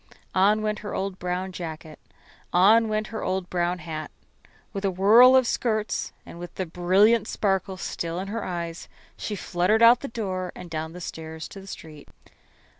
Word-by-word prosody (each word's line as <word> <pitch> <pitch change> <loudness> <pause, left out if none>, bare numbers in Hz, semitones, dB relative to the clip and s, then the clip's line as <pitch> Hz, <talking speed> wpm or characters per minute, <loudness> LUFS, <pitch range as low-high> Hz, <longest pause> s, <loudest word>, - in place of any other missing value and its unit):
On 205 +3 +3
went 215 0 -1
her 205 - -6
old 190 -1 -3
brown 180 +1 -3
jacket; 160 -3 -7 0.5
on 215 +6 +5
went 215 0 -1
her 220 - -3
old 185 -1 -2
brown 175 0 0
hat. 155 -3 -6 0.6
With 195 -1 -4
a 195 - +2
whirl 220 +8 +7
of 260 -1 +5
skirts 215 -2 -1
and 170 - -11
with 175 0 -8
the 185 - -2
brilliant 195 +6 +3
sparkle 195 -2 -1
still 170 -1 -4
in 190 +2 -4
her 225 0 -3
eyes, 170 -2 -5 0.3
she 210 - -4
fluttered 190 +4 +1
out 235 +2 +8
the 280 - -5
door 185 -6 -3
and 180 -2 -10
down 160 0 -4
the 180 - -9
stairs 160 -1 -7
to 195 - -10
the 195 - -13
street. 155 -5 -10
185 Hz, 180 wpm, -25 LUFS, 175-215 Hz, 0.6 s, out